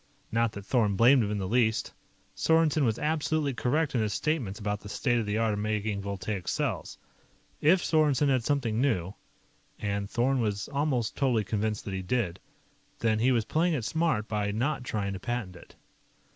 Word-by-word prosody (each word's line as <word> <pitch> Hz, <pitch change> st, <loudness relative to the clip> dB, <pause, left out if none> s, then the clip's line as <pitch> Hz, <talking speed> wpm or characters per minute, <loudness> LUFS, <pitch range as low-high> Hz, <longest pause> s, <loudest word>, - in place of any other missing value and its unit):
Not 115 Hz, 0 st, +1 dB
that 100 Hz, -2 st, -8 dB
Thorn 105 Hz, -4 st, +2 dB
blamed 125 Hz, +5 st, +6 dB
him 100 Hz, -, -2 dB
in 105 Hz, -, -1 dB
the 95 Hz, -2 st, -2 dB
least. 110 Hz, 0 st, +1 dB, 0.4 s
Sorensen 160 Hz, -2 st, +3 dB
was 110 Hz, -2 st, +1 dB
absolutely 155 Hz, -2 st, 0 dB
correct 145 Hz, +6 st, 0 dB
in 120 Hz, -, +1 dB
his 105 Hz, -2 st, -1 dB
statements 135 Hz, -11 st, -1 dB
about 105 Hz, -1 st, -2 dB
the 105 Hz, -, -11 dB
state 120 Hz, +2 st, +1 dB
of 110 Hz, -, -3 dB
the 105 Hz, +1 st, 0 dB
art 110 Hz, -1 st, +1 dB
of 105 Hz, -, -2 dB
making 105 Hz, -1 st, -1 dB
voltaic 100 Hz, -1 st, -4 dB
cells. -, -, -2 dB, 0.6 s
If 175 Hz, +4 st, +4 dB
Sorensen 150 Hz, -3 st, +3 dB
had 130 Hz, -3 st, +2 dB
something 120 Hz, -5 st, 0 dB
new 95 Hz, -9 st, 0 dB, 0.6 s
and 100 Hz, -1 st, -2 dB
Thorn 130 Hz, +2 st, +1 dB
was 105 Hz, -2 st, -1 dB
almost 140 Hz, -5 st, -1 dB
totally 125 Hz, -6 st, +1 dB
convinced 105 Hz, +1 st, -2 dB
that 100 Hz, -, -4 dB
he 95 Hz, -, -2 dB
did 95 Hz, -3 st, -1 dB, 0.6 s
then 110 Hz, -1 st, +1 dB
he 125 Hz, +4 st, +3 dB
was 115 Hz, -4 st, +1 dB
playing 165 Hz, +6 st, +1 dB
it 120 Hz, -7 st, -3 dB
smart 160 Hz, -6 st, 0 dB
by 105 Hz, -1 st, -1 dB
not 125 Hz, +6 st, -1 dB
trying 105 Hz, -5 st, -2 dB
to 95 Hz, -, -5 dB
patent 115 Hz, -4 st, -4 dB
it. 85 Hz, -, -15 dB
115 Hz, 185 wpm, -28 LUFS, 105-135 Hz, 0.6 s, blamed